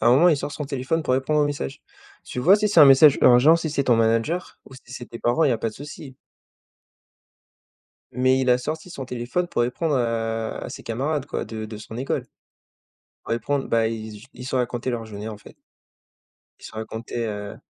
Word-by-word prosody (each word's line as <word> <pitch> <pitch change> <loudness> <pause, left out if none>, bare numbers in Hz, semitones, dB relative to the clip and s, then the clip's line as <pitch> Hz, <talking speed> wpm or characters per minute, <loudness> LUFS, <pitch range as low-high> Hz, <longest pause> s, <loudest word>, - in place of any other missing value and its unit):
À - - +1
un - - +6
moment, 170 +6 +6
il 155 - +4
sort 145 - -5
son 150 - -5
téléphone 140 +4 -2
pour 130 - +1
répondre 150 +3 +1
aux - - +4
messages. 145 - -5 0.4
Tu - - -7
vois, 185 +10 +6
si 210 0 0
c'est 175 - +5
un 150 - +11
message 135 +1 +7
urgent, 130 +7 +7
si 160 -2 -3
c'est 140 -2 -1
ton 120 -2 +4
manager 115 +10 0
ou 135 - -13
si 125 0 -14
c'est 120 -1 -8
tes 115 - -9
parents, 120 +7 +2
il 145 - +3
y - - +3
a 115 - -1
pas 115 - -1
de - - -16
souci. 145 -2 -10 2.0
Mais 130 +2 +2
il 130 - +2
a 125 - +4
sorti 155 +7 -5
son 135 -6 -6
téléphone 125 +8 -3
pour 120 - -1
répondre 145 +6 -1
à 115 -2 -1
à - - -5
ses - - -9
camarades, 140 +5 -2
quoi, - - -4
de 110 0 -6
de 110 0 -8
son 110 +1 -9
école. 130 +2 -2 1.0
Pour - - -9
répondre, 135 +4 -1
bah, 115 -1 +2
il 110 -1 -5
z - - -10
j 125 - -15
ils 125 +1 -9
se 130 - -4
racontaient 125 0 -1
leur 115 -2 -3
journée, 105 0 -7
en 105 -2 -8
fait. - - -16 1.0
Ils - - -12
se - - -10
racontaient 110 +2 -5
heu 105 -1 -6
125 Hz, 225 wpm, -23 LUFS, 115-145 Hz, 2.0 s, un